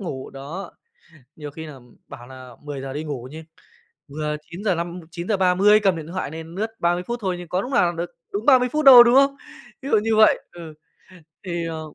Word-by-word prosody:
ngủ, 135 -9 -6
đó, 155 +8 -8 0.6
nhiều 150 -2 -8
khi 160 +2 -9
nà, 150 - -9
ừm, 125 -3 -18
bảo 120 - -12
nà 130 -1 -12
10:00 135 -2 -6
đi 150 +2 -4
ngủ 135 -5 -6
nha, 160 +1 -9 0.6
vừa 150 +1 -4 0.2
9:05 175 -2 -3
9:30 190 +3 +3
cầm 190 -4 +3
điện 155 -1 -8
thoại 170 -4 -5
nên 160 +1 -9
lướt 215 +4 -2
30 175 +1 0
phút 240 0 -3
thôi 190 -3 -2
nhưng 175 - -9
có 180 +2 -1
lúc 250 - -7
nào 180 -9 +2
được 170 +1 -4 0.2
đúng 205 +3 -3
30 255 -3 +5
phút 305 -1 0
đâu, 250 -3 +11
đúng 240 +2 +3
không? 275 0 +4 0.5
Ví 275 - -6
dụ 220 - +4
như 225 -1 +1
vậy 215 - +5
ừ. 165 -3 -10 0.7
Thì, 170 -2 -4
ờ 160 -1 -5
175 Hz, 205 wpm, -22 LUFS, 150-205 Hz, 0.7 s, đâu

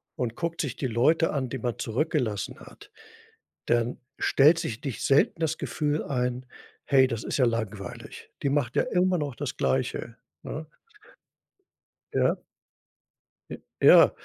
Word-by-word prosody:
und 120 -2 -3
guckt 170 -1 -2
sich 140 -5 -3
die 135 - -2
Leute 150 +8 +2
an, 130 -4 -2
die 135 - -4
man 120 0 -3
zurückgelassen 120 -4 -1
hat, - - -15 0.8
dann 120 0 +1 0.2
stellt 155 +5 +5
sich 115 -7 -4
nicht 135 -6 -4
selten 140 +4 +3
das 160 -1 0
Gefühl 150 0 -1
ein: 125 -2 -2 0.4
„Hey, 130 -1 +5
das 115 -3 -4
ist - - -2
ja 130 - +4
langweilig. 110 -4 -4
Die 140 - +2
macht 140 -4 0
ja - - +3
immer 180 0 +1
noch 145 -5 -3
das - - -5
Gleiche, 65 - -1 0.3
ne?" 155 +1 -6 1.5
Ja. - - +3 1.2
J - - -5 0.2
ja. - - +8
130 Hz, 145 wpm, -27 LUFS, 115-150 Hz, 1.5 s, ja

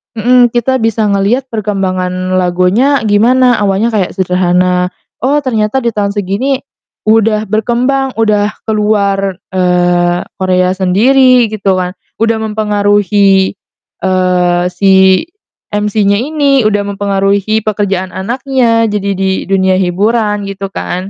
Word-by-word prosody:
mhm, 245 +1 +3
kita 250 +2 0
bisa 225 -3 0
ngeliat 220 +7 0
perkembangan 185 -3 -2
lagunya 185 +10 +1
gimana, 240 +4 +3
awalnya 205 +3 0
kayak 205 -5 -1
sederhana, 180 0 0 0.3
oh, 290 +2 +1
ternyata 240 -1 -1
di 235 - 0
tahun 205 -2 -2
segini 210 +7 -2 0.5
udah 215 -1 +2
berkembang, 250 +5 0
uda 210 -2 +1
ke 220 - -3
luar, 200 -2 0 0.2
eee, 175 -1 +1 0.2
Korea 185 -1 +1
sendiri, 245 +5 +3
gitu 200 -3 -1
kan, 180 +1 -5 0.2
udah 225 0 +2
mempengaruhi, 205 -2 +1 0.5
eee, 180 -1 +1
si 190 +3 +3 0.5
MC-nya 210 0 0
ini, 280 -1 +1
udah 205 -1 -1
mempengaruhi 200 +2 0
pekerjaan 195 -3 -2
anaknya 235 +2 0
jadi 205 -2 -2
di 190 0 0 0.2
dunia 190 -1 +2
hiburan, 210 +3 0
gitu 195 0 -6
kan, 185 0 -5
205 Hz, 115 wpm, -11 LUFS, 190-225 Hz, 0.5 s, mhm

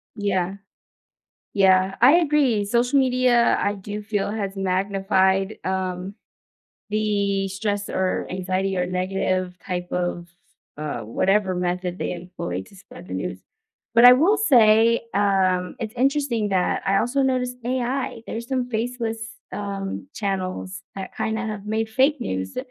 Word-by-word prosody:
Yeah. 195 -3 -1 1.0
Yeah. 190 -1 +4
I 265 +7 +7
agree, 285 -10 +2
social 245 +5 +2
media, 250 -2 +3
I 205 0 0
do 205 +2 -6
feel 205 -1 -2
has 205 -2 -3
magnified, 195 +1 +1
um, 185 0 -3 0.8
the 200 -2 0
stress 200 +1 -3
or 185 0 -1
anxiety 185 +1 -1
or 180 - +1
negative 185 0 -1
type 180 -1 -3
of, 175 -1 -2 0.5
uh, 150 -1 -4
whatever 190 - +1
method 180 0 -2
they - - -3
employ 170 - -5
to - - -18
spread 195 - -13
the - - -6
news. - - -4 0.5
But 235 +1 +7
I 250 - +11
will 355 +11 +4
say, 230 - +5
um, 190 -2 +1
it's 220 -1 -4
interesting 260 -5 +1
that 185 -2 +1
I 195 0 +3
also 250 +6 +1
noticed 250 -1 0
AI. 255 -1 -2
There's 230 +1 -5
some 255 -1 -1
faceless, 225 -1 -3 0.2
um, 200 +5 -5
channels 185 - -3
that 190 -1 -7
kinda 220 +1 -2
have 210 -2 -5
made 220 +1 -1
fake 265 +4 +2
news. 95 - -4
200 Hz, 135 wpm, -23 LUFS, 185-235 Hz, 1.0 s, I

